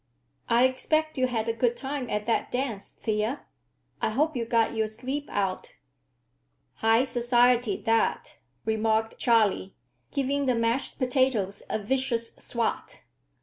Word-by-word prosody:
"I 235 +1 +5
expect 310 +4 0
you 255 - +3
had 230 -2 -2
a 230 - +1
good 240 +1 +1
time 265 0 -4
at 210 0 -2
that 230 - 0
dance, 245 -6 -2
Thea. 220 +5 -2 0.6
I - - +2
hope 300 +7 0
you 235 -2 -1
got 230 -1 +2
your 220 -1 0
sleep 265 +6 -4
out." 195 -2 -2 1.0
"High 225 +2 +4
society, 245 -3 +2
that," 225 -1 0 0.3
remarked 220 0 0
Charley, 215 -5 +2 0.4
giving 280 0 0
the 250 - +3
mashed 230 +3 -1
potatoes 250 -7 +1
a - - 0
vicious 235 +1 -1
swat. 235 -1 -3
235 Hz, 135 wpm, -27 LUFS, 220-260 Hz, 1.0 s, I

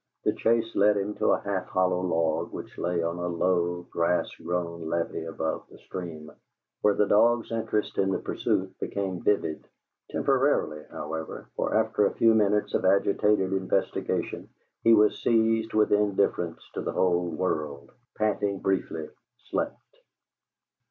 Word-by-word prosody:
The - - +2
chase 115 0 +1
led 105 +1 +4
him 100 +1 -2
to - - 0
a - - +3
half 100 -2 -2
hollow 90 -1 +1
log 80 -3 0
which - - -8
lay 85 -1 0
on 85 +1 -2
a 90 - -2
low, 90 0 0
grass 85 +1 +1 0.2
grown 85 -1 -3
levee 85 -1 -2
above 80 -1 -3
the - - -14
stream, 80 -4 -7 0.5
where 105 -1 +3
the 105 - +3
dog's 115 +4 +3
interest 110 -2 -1
in 95 - +3
the 95 - +1
pursuit - - -1
became 95 -3 -3
vivid; 80 -6 0 0.5
temporarily, 135 - +1
however, 80 +1 -6
for - - -1
after 110 -2 +3
a - - -5
few 115 -1 +5
minutes 105 -1 +2
of - - +1
agitated 100 0 +3
investigation, 95 -1 -1 0.3
he 115 0 +7
was 105 0 +3
seized 115 -1 +2
with 110 -1 +3
indifference 100 -5 +1
to - - -3
the - - -3
whole 90 -1 +2
world; 75 -4 -3 0.3
panted 100 -2 0
briefly; 80 -5 -1 0.4
slept. - - -1
95 Hz, 145 wpm, -27 LUFS, 85-105 Hz, 0.5 s, he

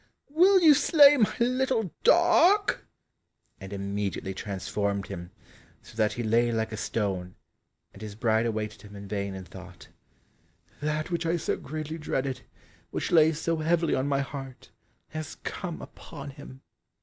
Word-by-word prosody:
will 370 +5 +5
you 315 -3 +8
slay 290 0 +6
my 225 -7 +2
little 250 -5 0
dog?" 350 +4 +4 0.8
and 95 0 -9
immediately 100 -1 -3
transformed 100 0 -3
him, 85 +1 -7 0.5
so - - -15
that 110 -1 +1
he 120 - -4
lay 115 +2 +2
like 110 -1 -1
a - - -4
stone, 95 -5 -3 0.6
and 100 - -14
his 105 -2 -7
bride 110 0 +1
awaited 110 -1 -4
him 105 -1 -13
in 100 0 -9
vain 100 -1 -3
and 95 -1 -9
thought, - - -12 0.9
"That 150 +3 -2
which 170 -1 -1
I 170 +1 +1
so 160 - -1
greatly 155 +2 -6
dreaded, 135 -3 -2 0.5
which - - -3
lay 160 -2 +6
so 165 +1 -2
heavily 165 +1 +1
on 130 +1 0
my 140 -1 +1
heart, 135 -2 -8 0.4
has 155 0 -6
come 175 -4 -5
upon 145 -3 -10
him!" 135 -2 -12
135 Hz, 150 wpm, -27 LUFS, 105-170 Hz, 0.9 s, you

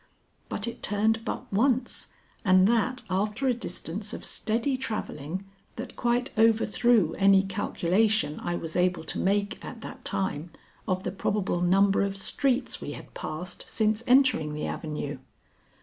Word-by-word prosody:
But 205 - -3
it 235 - -6
turned 220 +2 +1
but 245 -1 -5
once 255 +4 +1 0.4
and 185 -2 +5
that 235 +4 +1
after 210 +7 0
a 255 - +4
distance 205 -2 -4
of - - -4
steady 235 +5 0
travelling 190 - -4 0.3
that 245 +3 -7
quite 240 +1 0
overthrew 225 -4 +4
any 195 -1 +6
calculation 195 -1 +1
I 175 - -2
was 165 -2 -5
able 180 -1 +2
to - - -3
make 200 +2 0
at 230 - -8
that 255 +3 -9
time 175 -3 -2 0.4
of 185 -1 0
the - - -2
probable 195 -2 -1
number 195 +2 +4
of 200 0 -1
streets 255 +6 0
we - - -5
had - - -11
passed 180 +4 -5
since 220 +1 +1
entering 250 - +4
the 150 - -3
avenue. 150 -3 -4
205 Hz, 150 wpm, -27 LUFS, 185-230 Hz, 0.4 s, any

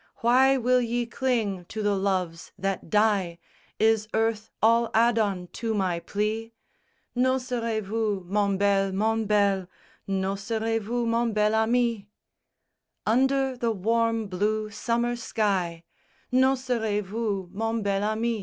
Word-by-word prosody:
Why 260 +3 +5
will 250 0 +3
ye 240 0 -1
cling 230 -7 -1
to 215 +4 -5
the 205 0 +2
loves 185 -4 -2
that 195 -3 -3
die? 200 -4 +2 0.4
Is 220 -1 +2
earth 220 -1 0
all 230 +1 +3
Adon 220 -5 +2
to 225 -1 -2
my 185 -4 0
plea? 215 +5 -3 0.6
N'oserez 245 -3 0
vous, 210 -1 -1
mon 200 +1 +1
bel, 195 -1 +2
mon 220 +3 +1
bel, 200 -3 +2 0.4
N'oserez 200 +4 -1
vous, 235 +3 -2
mon 230 0 +1
bel 210 0 +2
ami? 230 +1 +2
VI 200 - -16 1.0
Under 265 +3 +2
the 240 -2 -1
warm 225 +2 0
blue 210 +3 -1
summer 235 +3 -1
sky, 190 -8 -1 0.5
_N'oserez 250 -5 +1
vous, 200 -2 -3
mon 225 +2 -2
bel 200 -1 0
ami? 220 +2 -1
220 Hz, 125 wpm, -26 LUFS, 200-235 Hz, 1.0 s, Why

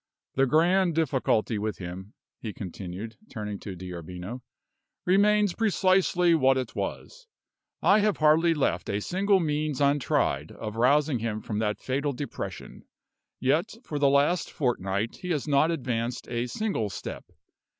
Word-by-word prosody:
"The 135 0 +3
grand 170 +4 +3
difficulty 125 -8 +1
with 105 -3 -3
him," 95 +3 -8 0.2
he 110 -3 -5
continued, 95 +3 -7
turning 105 -4 -5
to 95 - -7
D'Arbino, 90 +5 -7 0.6
"remains 205 +1 +4
precisely 185 -4 +3
what 135 -4 +4
it 125 -3 -3
was. - - -5 0.6
I 205 - +6
have 210 -1 +2
hardly 160 +2 +4
left 130 - 0
a 100 - 0
single 195 - +2
means 150 -3 -1
untried 140 -1 +1
of 110 -1 -6
rousing 140 +3 +3
him 110 -1 -2
from 105 -1 -4
that 105 -1 -1
fatal 140 +2 -1
depression; 140 +3 -6 0.6
yet, - - +1
for 145 - -4
the 140 -1 +4
last 145 +5 +2
fortnight, 110 -5 -1
he 180 - -7
has 155 -4 -1
not 145 +2 +3
advanced 125 -6 -2
a 120 0 -1
single 160 - -2
step. 95 - -7
135 Hz, 140 wpm, -27 LUFS, 110-165 Hz, 0.6 s, I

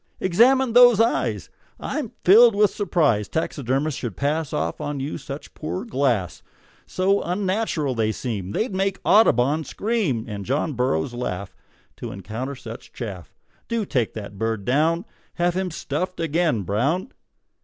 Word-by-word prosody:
"Examine 240 +7 +4
those 245 -3 +7
eyes. 230 +1 0 0.3
I'm 290 -8 -4
filled 225 +4 +7
with 210 0 +4
surprise 155 - +1
Taxidermists 140 -2 -1
should 115 -7 -5
pass 150 +1 -1
Off 150 - -2
on 145 -1 -3
you 140 +3 -4
such 140 +2 -8
poor 185 +7 -5
glass; 125 - 0 0.5
So 195 +2 +1
unnatural 185 -5 -1
they 110 -2 0
seem 105 -6 -4
They'd 215 - -1
make 195 +1 -1
Audubon 155 - +4
scream, 195 - -1
And 105 -2 -5
John 145 +6 -1
Burroughs 125 -6 0
laugh 100 -6 -4 0.4
To - - -6
encounter 110 +8 -5
such 115 -2 -10
chaff. 100 -8 -7 0.4
Do 230 -2 -1
take 125 - -1
that 100 -2 -8
bird 110 -3 -2
down; 160 +6 +2 0.3
Have 175 0 +1
him 185 0 -1
stuffed 170 +3 -4
again, 165 - +1
Brown!" 135 - -1
150 Hz, 145 wpm, -23 LUFS, 120-190 Hz, 0.5 s, those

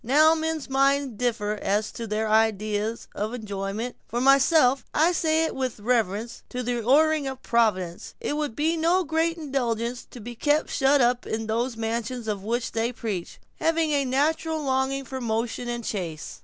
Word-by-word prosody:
Now, 305 +6 +5
men's 320 -2 -2
minds 275 -1 +2
differ 225 -4 0
as 210 +2 0
to 230 - -6
their 215 +1 -1
ideas 215 0 +1
of 215 +4 -3
enjoyment. 210 +1 -4
For 240 - -2
myself, 270 0 +4
and 305 - +4
I 340 - +5
say 320 -2 +2
it - - -3
with 255 -4 -3
reverence 225 0 -1
to 250 0 -4
the 240 0 -1
ordering 300 +4 +3
of 265 -1 -6
Providence, 185 -7 0
it 290 - -2
would 295 -6 -2
be 315 +3 +1
no 340 +3 +2
great 325 +1 0
indulgence 245 -5 -2
to 245 - -11
be 240 +2 -7
kept 295 +6 +1
shut 270 +1 +3
up 245 0 +2
in 225 0 -2
those 230 +2 -1
mansions 230 +1 -3
of 205 -2 -2
which 235 +3 -2
they 230 +1 0
preach, 215 -7 -5 0.2
having 325 -1 +1
a 285 -1 +2
natural 310 +4 0
longing 265 0 0
for 260 +1 -6
motion 230 +1 -2
and 240 0 -3
the - - -6
chase." 170 -7 -5
245 Hz, 185 wpm, -25 LUFS, 225-285 Hz, 0.2 s, Now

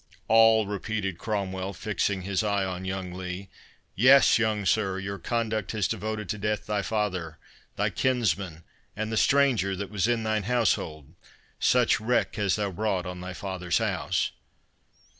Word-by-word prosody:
"All"—repeated 110 -3 +3
Cromwell, 100 -2 -3
fixing 100 0 -1
his 100 +2 -1
eye 100 -2 +1
on 95 0 -5
young 95 -1 -4
Lee. 90 +1 -6 0.4
"Yes, 130 +3 +6
young 110 -3 0
sir, 95 -1 +1
your 100 0 -5
conduct 110 -1 -2
has 105 -3 +1
devoted 110 -1 -3
to 105 - -3
death 105 0 -1
thy 105 -1 -1
father, 95 -7 -2 0.4
thy - - 0
kinsman, 100 -10 0 0.3
and 110 +1 -3
the - - -1
stranger 125 -7 +3
that 100 +1 -6
was 105 +1 +1
in 120 -2 +1
thine 110 -1 0
household. 80 - 0 0.5
Such 125 -4 +3
wreck 120 +4 0
hast 100 -4 +1
thou 100 -2 -1
brought 95 -1 -1
on 90 0 -6
thy 90 0 -6
father's 90 -2 -2
house." - - 0
100 Hz, 150 wpm, -27 LUFS, 95-110 Hz, 0.5 s, Yes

